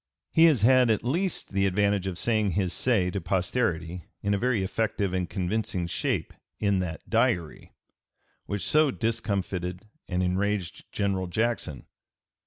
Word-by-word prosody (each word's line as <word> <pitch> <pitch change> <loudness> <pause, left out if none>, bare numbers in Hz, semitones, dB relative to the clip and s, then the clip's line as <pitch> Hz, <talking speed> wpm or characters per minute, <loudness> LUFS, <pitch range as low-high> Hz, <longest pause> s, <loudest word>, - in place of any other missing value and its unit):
He 165 - +6
has 150 -10 +4
had 125 +1 +5
at 110 - +1
least 170 - -1
the 100 0 +2
advantage 100 0 +1
of 90 -2 -3
saying 110 -2 +1
his 95 -2 0
say 100 -8 +1
to 100 - -3
posterity 90 -2 -1 0.2
in 100 0 +1
a - - +2
very 120 -4 +1
effective 100 -1 -1
and 90 -2 -1
convincing 95 -1 -2
shape 85 - -2 0.3
in 100 -2 +2
that 80 -5 -5
Diary, 85 -4 0 0.7
which 100 -4 -3
so 155 - +4
discomfited 100 -6 -2 0.2
and 90 0 0
enraged 95 0 -2
General 95 -2 -1
Jackson. 110 - -1
100 Hz, 145 wpm, -27 LUFS, 90-110 Hz, 0.7 s, He